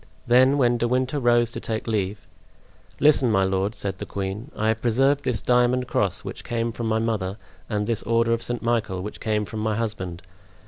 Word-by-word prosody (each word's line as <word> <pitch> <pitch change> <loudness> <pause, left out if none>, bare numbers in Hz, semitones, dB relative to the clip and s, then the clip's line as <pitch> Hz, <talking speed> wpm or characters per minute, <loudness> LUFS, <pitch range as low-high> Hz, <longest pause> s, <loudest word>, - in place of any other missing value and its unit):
Then, 130 +3 +5
when 120 -3 +3
De 120 - +1
Winter 130 +4 0
rose 120 -2 +3
to - - -5
take 110 -1 -3
leave: 105 -3 -2 0.7
"Listen, 140 -3 +5
my 95 -3 +3
lord," 95 +2 0
said 95 -2 -4
the - - -4
queen; 100 +6 -4
"I 110 +1 0
have 110 0 0
preserved 135 +4 +2
this 125 -3 -1
diamond 125 +1 +2
cross 100 -4 0
which - - -7
came 115 -1 -2
from 115 0 -4
my 110 0 +1
mother, 110 -4 -1 0.3
and 105 -2 -1
this 115 0 -1
order 115 +1 +2
of 115 - -1
St. 120 0 -4
Michael 110 -6 0
which 105 - -7
came 105 -1 0
from 110 - -6
my 110 0 0
husband. 100 -6 -4
115 Hz, 200 wpm, -24 LUFS, 105-120 Hz, 0.7 s, Then